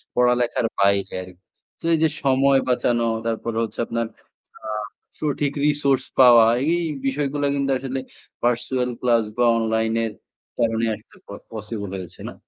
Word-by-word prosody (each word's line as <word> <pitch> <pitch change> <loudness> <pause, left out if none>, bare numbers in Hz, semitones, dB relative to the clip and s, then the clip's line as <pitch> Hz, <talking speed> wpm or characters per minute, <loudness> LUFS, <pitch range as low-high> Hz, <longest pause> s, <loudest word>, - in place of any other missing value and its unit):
পড়ালেখার 125 -1 +2
বাইরে 100 -1 +2
আরকি। 90 0 -15 0.4
তো - - -10
এই - - +4
যে 160 - +4
সময় 135 0 +4
বাঁচানো 120 -1 +1 0.2
তারপরে 115 0 -2
হচ্ছে 110 - -6
আপনার 115 0 -2 0.6
আ 110 - -5 0.5
সঠিক 145 -1 -1
রিসোর্স 145 -3 +2 0.2
পাওয়া 120 -3 +8 0.3
এই 175 0 +1 0.2
বিষয়গুলো 145 +1 -1
কিন্তু 140 -1 0
আসলে 135 0 -3 0.4
পার্সোনাল 125 +1 0
ক্লাস 120 -2 +3
বা 120 - +3
অনলাইন 110 0 0
এর 110 - -3 0.5
কারণে 115 0 +1
আসলে - - -19 0.4
পসিবল 105 -2 -5
হয়েছে 90 -3 -10
না। - - -9
120 Hz, 140 wpm, -22 LUFS, 110-135 Hz, 0.6 s, পাওয়া